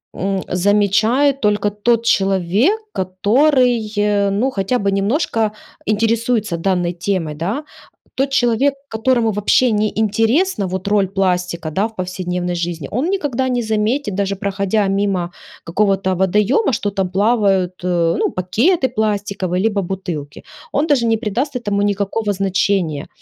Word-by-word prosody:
м, 195 0 -1
замечает 210 +9 +2
только 210 -1 +2
тот 230 +3 0
человек, 195 - +2
который, 230 - +2
э, 205 -1 +2
ну 230 +7 +1
хотя 205 +3 -1
бы 200 0 0
немножко 215 - 0 0.4
интересуется 225 -3 +1
данной 175 -1 0
темой, 175 -4 -2
да. 195 - -3 0.5
Тот 270 +1 +1
человек, 270 +1 +2 0.2
которому 225 0 +1
вообще 210 +4 +2
не 210 0 +1
интересна 225 - +1
вот 190 +1 -4
роль 205 -2 +2
пластика, 180 -4 -1
да, 195 +7 0
в 220 - -23
повседневной 180 -1 -3
жизни, 170 -4 -3
он 255 +7 -1
никогда 265 -9 -1
не 245 -1 0
заметит 220 +1 -1
даже 200 0 -1
проходя 200 +1 0
мимо 195 -3 0 0.4
какого-то 190 +1 +1
водоёма, 210 - +2
что 205 -2 -1
там 195 -2 -1
плавают, 195 -3 +2
э, 170 -2 +1
ну - - +1
пакеты 255 - +1
пластиковые, 200 -4 -1
либо 210 -2 +1
бутылки. 175 -6 -5 0.3
Он 295 +3 0
даже 275 -6 +2
не 225 - +2
придаст 245 +7 -2
этому 205 -4 -1
никакого 205 +1 -1
значения, 185 -5 0
205 Hz, 135 wpm, -18 LUFS, 185-230 Hz, 0.5 s, замечает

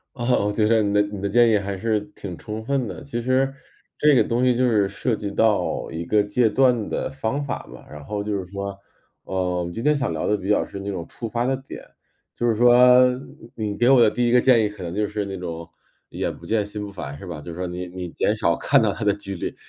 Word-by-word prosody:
哦， 120 -4 +1
我 105 - +1
觉 105 +1 +1
得 110 0 +4
你 100 0 0
的 105 - +4
你 105 -1 -6
的 100 - -1
建 120 +3 +5
议 110 - +4
还 100 -1 -4
是 110 +1 0
挺 90 -5 -7
充 110 +1 -6
分 135 +1 0
的。 - - -7
其 120 -4 -4
实， 130 +2 +1 0.4
这 150 0 +4
个 130 - +5
东 120 +1 0
西 125 - +4
就 125 +1 +2
是 105 -4 +2
涉 110 +4 -1
及 100 -1 -5
到 110 0 +1
一 80 +1 -5
个 105 +4 +3
戒 105 +3 +2
断 125 -3 +2
的 - - -2
方 135 +1 -2
法 140 - -4
嘛， - - -13
然 75 -1 -10
后 105 +6 -4
就 105 0 -2
是 95 - -5
说， 100 0 -5 0.5
呃， 90 -2 -2
今 115 - -5
天 150 +3 +3
想 135 -2 -1
聊 - - -2
得 105 - +2
比 100 -1 -5
较 105 - +3
深 100 0 -8
那 100 - -3
种 90 -4 -5
触 115 - -7
发 120 +2 -1
的 135 +1 +1
点， 135 +1 -10 0.5
就 120 - -3
是 115 - +3
说， 120 +2 +5 0.8
你 105 -2 -3
给 120 - +3
我 135 -2 +6
的 110 -2 +5
第 120 0 0
一 120 - +2
个 125 - +6
建 120 -4 +4
议 - - +1
可 105 -2 -10
能 85 -1 -5
就 105 +2 0
是 105 - -3
那 95 -1 -5
种， 85 -2 -6 0.4
眼 - - -3
不 - - -14
见 110 -2 0
心 105 0 -6
不 100 - -8
烦， 70 -7 -7
是 90 - -10
吧？ 85 -4 -6
就 75 +3 -8
说 90 +2 -4
你 90 0 -5
你 90 0 -6
减 105 +5 0
少 95 -6 +1
看 - - +3
到 - - +2
它 - - -5
的 105 - +4
几 100 -1 -6
率， 85 - -4
105 Hz, 285 characters per minute, -23 LUFS, 95-120 Hz, 0.8 s, 我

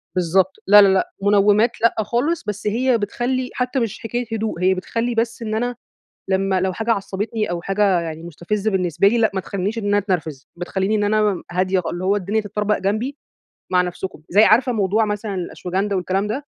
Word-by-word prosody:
بالضبط. 185 +2 +2
لا، 205 +1 +9
لا، 200 - +6
لأ، 190 -1 +1
منومات 205 +3 +3
لأ 230 - +3
خالص، 250 +10 -1
بس 210 0 -4
هي 245 +3 +2
بتخلّي 250 +4 -2
حتى 250 +1 -1
مش 230 -4 -3
حكاية 240 +2 -3
هدوء، 215 -6 -3
هي 185 +1 +4
بتخلّي 230 +6 -2
بس 230 +1 -1
إن 215 -1 -3
أنا 245 +2 -1 0.5
لمّا 190 0 +1
لو 190 0 0
حاجة 225 +5 -3
عصبتني 210 +1 -3
أو 175 -1 -3
حاجة 195 -1 +2
يعني 160 -1 -6
مستفزة 185 +6 -3
بالنسبة 185 -1 +2
لي 235 +3 +1
لأ، 220 -2 +3
ما 190 - 0
تخلينيش 200 +4 -3
إن 220 - -4
أنا 205 0 +3
اتنرفز، 160 -9 -3
بتخليني 190 +4 -1
إن 210 -1 +1
أنا 215 +1 +2
مم 205 -4 0
هادية 185 +1 +1
خال 170 - -4
اللي 175 +1 -4
هو 195 +2 +2
الدنيا 205 +3 -1
تتطربق 210 0 -1
جنبي، 215 +8 -2 0.6
مع 180 -1 +4
نفسكم. 180 -1 -5
زي 205 +4 +5
عارفة 240 +4 +4
موضوع 215 0 +1
مثلًا 210 -1 -3
الأشواجندا 185 +2 -3
والكلام 190 +2 -1
ده؟ 265 +7 -4
205 Hz, 200 wpm, -21 LUFS, 185-225 Hz, 0.6 s, لا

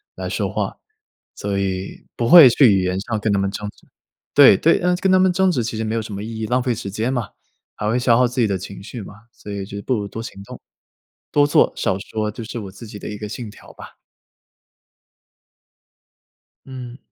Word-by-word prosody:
来 - - -5
说 - - -2
话， - - -3 0.6
所 100 -1 -3
以 95 -1 -4
不 120 - 0
会 165 -6 +10
去 125 +1 +5
语 95 -1 +2
言 90 +1 -1
上 110 +2 -3
跟 110 - 0
他 100 - +1
们 100 0 0
争 105 +1 -5
执。 - - -19 0.5
对 - - +8
对， - - +3
呃， 180 +1 +1
跟 190 - 0
他 185 - +6
们 185 0 +4
争 190 +1 +3
执 125 -9 -1
其 115 0 -4
实 110 - -2
没 110 +1 -2
有 115 - 0
什 110 -1 -8
么 100 - -5
意 110 0 -6
义， - - -1
浪 125 +2 +1
费 125 -2 0
时 100 -2 -6
间 115 +6 -2
嘛， 120 -5 -2 0.5
还 105 - -2
会 115 - +1
消 120 -2 +3
耗 125 0 +4
自 125 +1 -2
己 115 - +3
的 100 -2 -1
情 100 +2 -9
绪 115 +3 -8
嘛， 100 - -10 0.2
所 - - -13
以 100 -1 -4
就 100 +1 -7
不 130 - 0
如 105 -2 -3
多 110 - -7
行 100 -3 -9
动。 - - -11 0.7
多 145 -1 +4
做、 - - +4
少 95 - -1
说， 110 +2 -3
这 120 0 -8
是 115 +2 -6
我 100 -3 -7
自 100 +5 -12
己 105 -1 -9
的 - - -8
一 105 - -6
个 105 0 -7
信 115 +1 -6
条 - - -16
吧。 - - -13 2.7
嗯。 125 -2 -9
110 Hz, 250 characters per minute, -20 LUFS, 100-125 Hz, 2.7 s, 会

